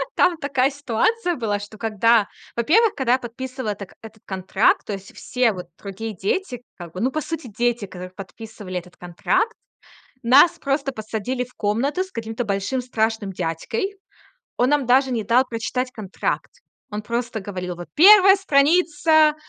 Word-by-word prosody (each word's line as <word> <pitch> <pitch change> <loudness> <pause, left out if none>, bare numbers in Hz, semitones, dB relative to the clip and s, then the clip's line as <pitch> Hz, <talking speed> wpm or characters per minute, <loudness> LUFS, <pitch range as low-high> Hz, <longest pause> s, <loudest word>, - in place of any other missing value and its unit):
там 355 -2 +3
такая 275 -3 +1
ситуация 290 - 0
была, 215 -6 -1
что 205 +1 -10
когда 225 0 +3 0.3
Во-первых, 385 - +3
когда 255 -3 +1
я 260 - +2
подписывала 255 -1 -5
это 200 -2 -7
этот 220 -1 -13
контракт, 190 +2 +1
то 205 - -3
есть 195 0 -8
все 250 -3 +1
вот 180 -3 -7
другие 210 +3 -6
дети, 245 - -2
как 170 -2 -10
бы, 185 - -5
ну, 255 +3 +1
по 310 - -2
сути, 320 -2 -5
дети, 235 0 -1
которые 185 -1 -9
подписывали 200 -1 -7
этот 180 0 -17
контракт. 175 - 0 0.7
Нас 285 +8 +6
просто 275 -1 -1
посадили 225 +3 -3
в 250 - -20
комнату 235 - 0
с 375 - -9
каким-то 225 -1 -4
большим 200 +5 -1
страшным 220 -4 -1
дядькой. 185 - -3 0.6
Он 245 - +2
нам 290 -4 +2
даже 260 +2 +4
не 225 -3 -1
дал 245 +3 +4
прочитать 245 +2 -3
контракт. 210 -6 -3 0.4
Он 210 0 -4
просто 235 0 -3
говорил: 185 -2 -5
"Вот 175 0 -9
1 390 +3 +8
страница, 315 -2 +3
235 Hz, 160 wpm, -22 LUFS, 205-280 Hz, 0.7 s, 1